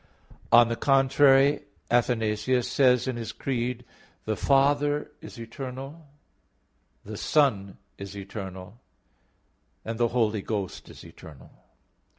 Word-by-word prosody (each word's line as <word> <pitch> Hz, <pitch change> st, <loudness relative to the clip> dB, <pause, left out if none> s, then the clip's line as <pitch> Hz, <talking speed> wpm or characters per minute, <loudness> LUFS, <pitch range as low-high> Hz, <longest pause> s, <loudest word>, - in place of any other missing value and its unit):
On 120 Hz, 0 st, +7 dB
the 115 Hz, -, -2 dB
contrary, 135 Hz, +2 st, +4 dB, 0.3 s
Athanasius 120 Hz, 0 st, +1 dB
says 125 Hz, -2 st, +3 dB
in 130 Hz, -2 st, -2 dB
his 115 Hz, -1 st, -5 dB
Creed: 125 Hz, -2 st, -3 dB, 0.4 s
"The 110 Hz, -, -1 dB
Father 145 Hz, +4 st, +1 dB
is 120 Hz, -, -11 dB
eternal, 135 Hz, +6 st, -8 dB, 1.0 s
the -, -, -7 dB
Son 105 Hz, -11 st, +1 dB, 0.2 s
is 100 Hz, 0 st, -8 dB
eternal, 95 Hz, +2 st, -8 dB, 1.0 s
the 115 Hz, +1 st, -1 dB
Holy 110 Hz, -3 st, 0 dB
Ghost 100 Hz, -3 st, -5 dB
is -, -, -13 dB
eternal." 75 Hz, -5 st, -14 dB
120 Hz, 105 wpm, -26 LUFS, 105-135 Hz, 1.0 s, On